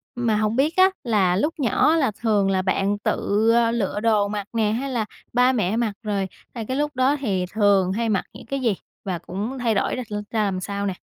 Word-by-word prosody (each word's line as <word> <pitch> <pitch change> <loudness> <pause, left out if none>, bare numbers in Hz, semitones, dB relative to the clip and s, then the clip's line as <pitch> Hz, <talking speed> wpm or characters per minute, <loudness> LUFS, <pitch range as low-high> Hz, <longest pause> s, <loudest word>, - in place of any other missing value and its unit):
Mà 235 -3 +1
hông 215 +1 0
biết 295 +5 +1
á 375 +1 +6
là 200 -7 +2
lúc 300 - 0
nhỏ 255 +2 +3
á - - +3
là 275 -8 +2
thường 210 -4 +2
là 190 - +1
bạn 195 +2 0
tự - - 0 0.6
lựa 205 -3 -1
đồ 210 -2 +2
mặc 205 -1 -4
nè 220 -2 +1
hay 255 +5 -2
là 230 -4 -1 0.3
ba 250 +1 +4
mẹ 215 -3 0
mặc 230 -3 0
rồi, 200 -3 -1 0.3
à, 230 - -4
cái 260 - -2
lúc 295 0 -1
đó 260 +3 +3
thì 195 -8 -1
thường 200 -3 +3
hay 230 +3 -1
mặc 195 -4 0
những - - -12
cái 275 +4 -3
gì 230 -6 +1 0.3
và 185 -3 -2
cũng 205 +9 -5
thay 235 -2 +1
đổi - - 0
ra 255 - -4
r - - -7 0.2
ra 220 -2 +1
làm 195 -2 -1
sao 200 +2 -3
nè? 195 - -1
215 Hz, 240 wpm, -23 LUFS, 200-245 Hz, 0.6 s, á